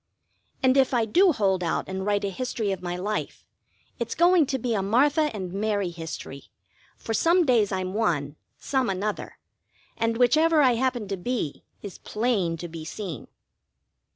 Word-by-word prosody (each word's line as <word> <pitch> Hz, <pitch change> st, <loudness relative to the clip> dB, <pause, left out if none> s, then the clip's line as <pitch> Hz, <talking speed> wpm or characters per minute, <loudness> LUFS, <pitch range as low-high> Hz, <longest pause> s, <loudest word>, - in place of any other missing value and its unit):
And 260 Hz, +1 st, +4 dB
if 265 Hz, -1 st, +3 dB
I 230 Hz, -2 st, +2 dB
do 360 Hz, -, +4 dB
hold 195 Hz, -, +1 dB
out 165 Hz, -, -1 dB
and 190 Hz, 0 st, -4 dB
write 205 Hz, -1 st, +1 dB
a 195 Hz, -, -2 dB
history 225 Hz, -1 st, -2 dB
of 190 Hz, -2 st, -4 dB
my 175 Hz, -1 st, -3 dB
life, 210 Hz, +4 st, -4 dB, 0.5 s
it's -, -, -3 dB
going 345 Hz, -3 st, +4 dB
to 265 Hz, -, -1 dB
be 245 Hz, -1 st, -2 dB
a 205 Hz, -, 0 dB
Martha 285 Hz, +9 st, +3 dB
and 190 Hz, -5 st, -6 dB
Mary 200 Hz, -2 st, -1 dB
history; 160 Hz, -4 st, -8 dB, 0.5 s
for 225 Hz, -, -4 dB
some 340 Hz, +8 st, +3 dB
days 230 Hz, -7 st, +3 dB
I'm 185 Hz, -1 st, -2 dB
one, 155 Hz, -10 st, 0 dB, 0.2 s
some 265 Hz, -4 st, -1 dB
another, 200 Hz, +2 st, -3 dB, 0.6 s
and 230 Hz, 0 st, 0 dB
whichever 305 Hz, +6 st, +4 dB
I 255 Hz, -, +5 dB
happen 245 Hz, -3 st, -1 dB
to 195 Hz, -, -2 dB
be 205 Hz, -, -3 dB, 0.2 s
is 200 Hz, -3 st, -8 dB
plain 210 Hz, -7 st, -1 dB
to 175 Hz, -, -6 dB
be 165 Hz, -1 st, -8 dB
seen. 165 Hz, -, -6 dB
215 Hz, 170 wpm, -25 LUFS, 185-255 Hz, 0.6 s, I